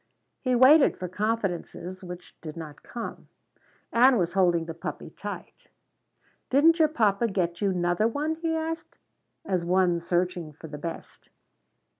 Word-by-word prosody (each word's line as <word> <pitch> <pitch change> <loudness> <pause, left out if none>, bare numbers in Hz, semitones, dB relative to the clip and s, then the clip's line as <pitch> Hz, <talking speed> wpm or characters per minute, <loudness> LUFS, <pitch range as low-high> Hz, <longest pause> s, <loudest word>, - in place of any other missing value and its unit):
He 255 -2 +1
waited 270 +4 +6
for 185 - -4
confidences 185 -2 -3
which 180 0 -9
did 155 0 -8
not 150 -3 -8
come. 235 - -7 0.7
Ann 250 +2 +6
was 175 -3 0
holding 175 -3 +3
the 165 - -5
puppy 165 - -6
tight. - - -8 0.8
"Didn't 325 +5 +5
your 315 - +6
papa 230 -6 +2
get 180 -4 -2
you 200 -1 +2
'nother 175 +3 +1
one?" 295 +7 -1
he 325 0 -1
asked, 320 0 -4 0.5
as 185 -3 0
one 175 0 +2
searching 175 -2 -1
for 160 - -13
the 150 -1 -7
best. 165 +1 -8
185 Hz, 145 wpm, -27 LUFS, 175-250 Hz, 0.8 s, waited